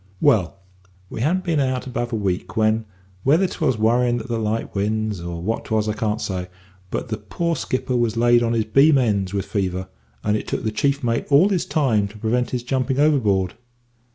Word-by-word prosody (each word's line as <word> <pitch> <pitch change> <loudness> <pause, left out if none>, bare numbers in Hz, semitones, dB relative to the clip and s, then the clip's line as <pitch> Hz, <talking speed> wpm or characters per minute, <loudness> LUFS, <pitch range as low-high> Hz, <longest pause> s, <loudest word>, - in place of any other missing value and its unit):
"Well, 90 -7 +2 0.5
we - - -5
hadn't 180 +8 +1
been 165 -4 0
out 130 -2 0
above 120 -2 -3
a - - -1
week 100 0 -2
when, 110 0 +2 0.4
whether 155 - +3
'twas 155 -9 0
worryin' 120 +2 +2
at 115 - -8
the 115 -1 -1
light 110 +1 -2
winds, 105 -1 -1
or 85 -1 -5
what 110 +4 -2
'twas 110 -1 0
I 105 - 0
can't 105 0 -1
say, 90 -5 -3 0.4
but 120 - -4
the 110 -1 -3
poor 170 +11 -2
skipper 130 -3 -2
was 115 -2 0
laid 120 0 +4
on 115 0 +1
his 110 -2 +1
beam 140 +6 +5
ends 100 -7 +1
with 100 -1 -2
fever, 95 -2 -2 0.3
and 105 0 +1
it 105 - -3
took - - -3
the 110 - -1
chief 140 +5 0
mate 115 -1 0
all 155 +8 +6
his 185 -4 0
time 115 -9 +1
to 105 +2 -13
prevent 120 +3 0
his 125 -2 -3
jumping 130 +1 -1
overboard. 105 - +2
115 Hz, 205 wpm, -22 LUFS, 105-130 Hz, 0.5 s, all